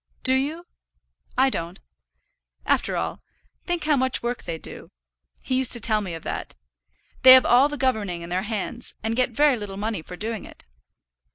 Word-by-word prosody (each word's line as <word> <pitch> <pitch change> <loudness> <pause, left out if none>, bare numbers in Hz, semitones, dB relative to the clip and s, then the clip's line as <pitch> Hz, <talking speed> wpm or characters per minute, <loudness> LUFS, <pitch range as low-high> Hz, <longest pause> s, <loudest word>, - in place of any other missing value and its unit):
"Do 260 - +3
you? 295 +6 -1 0.7
I 265 +1 +4
don't. 170 0 -3 0.9
After - - +1
all, - - -4 0.5
think 350 -3 -1
how 300 -1 +3
much 260 -2 0
work 240 0 -2
they 165 - -4
do. - - -10 0.5
He - - -3
used 255 -1 +3
to 240 - +1
tell 215 -1 +2
me 185 -5 -5
of 165 - -10
that. - - -5 0.7
They 255 0 +11
have 260 -1 +7
all 260 +4 +5
the 295 - -4
governing 210 -10 -1
in 170 - -8
their 180 +2 -1
hands, 220 +3 -5
and 225 +1 -1
get 250 0 +2
very 280 +2 +3
little 205 -3 -7
money 210 -3 -3
for 180 - -10
doing 220 +1 -3
it." - - -14
235 Hz, 185 wpm, -24 LUFS, 200-260 Hz, 0.9 s, They